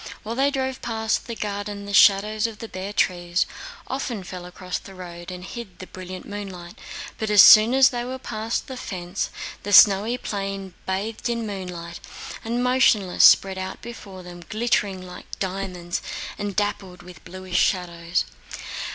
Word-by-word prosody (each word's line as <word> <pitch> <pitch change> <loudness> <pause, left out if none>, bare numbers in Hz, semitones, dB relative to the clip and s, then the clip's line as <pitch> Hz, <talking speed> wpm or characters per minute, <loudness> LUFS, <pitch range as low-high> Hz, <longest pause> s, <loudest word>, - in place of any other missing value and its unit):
While 220 - -4
they 270 +3 +2
drove 265 -2 -2
past 220 -2 -1
the 235 - -4
garden 205 -1 -4
the 200 - -6
shadows 210 +3 +5
of 225 -2 -9
the 225 - -7
bare 190 0 -6
trees 175 -3 +1 0.4
often 250 -6 -4
fell 180 -1 -8
across 180 0 -5
the 195 - -13
road 175 -1 -9
and 180 -1 -7
hid 215 -5 -8
the 185 - -8
brilliant 185 0 -9
moonlight, 190 -4 -7 0.5
but 220 - -2
as 210 -2 +9
soon 220 +4 +9
as 265 -1 +7
they 240 -1 -2
were 255 +1 -5
past 225 -2 -3
the 260 -3 -7
fence, 180 -4 -4 0.3
the 205 - -5
snowy 205 +4 +7
plain 195 -4 -4
bathed 205 +5 -2
in 235 -1 -1
moonlight 180 -4 -6 0.4
and 235 +2 -1
motionless 240 -7 +3
spread 190 -1 +6
out 190 0 -5
before 200 -5 -9
them 175 0 -10
glittering 210 -4 0
like 180 -1 -10
diamonds 185 -2 -3 0.3
and 205 -2 -4
dappled 200 -3 -2
with 180 -2 -13
bluish 185 0 -3
shadows. 170 -2 0
195 Hz, 160 wpm, -24 LUFS, 180-220 Hz, 0.5 s, as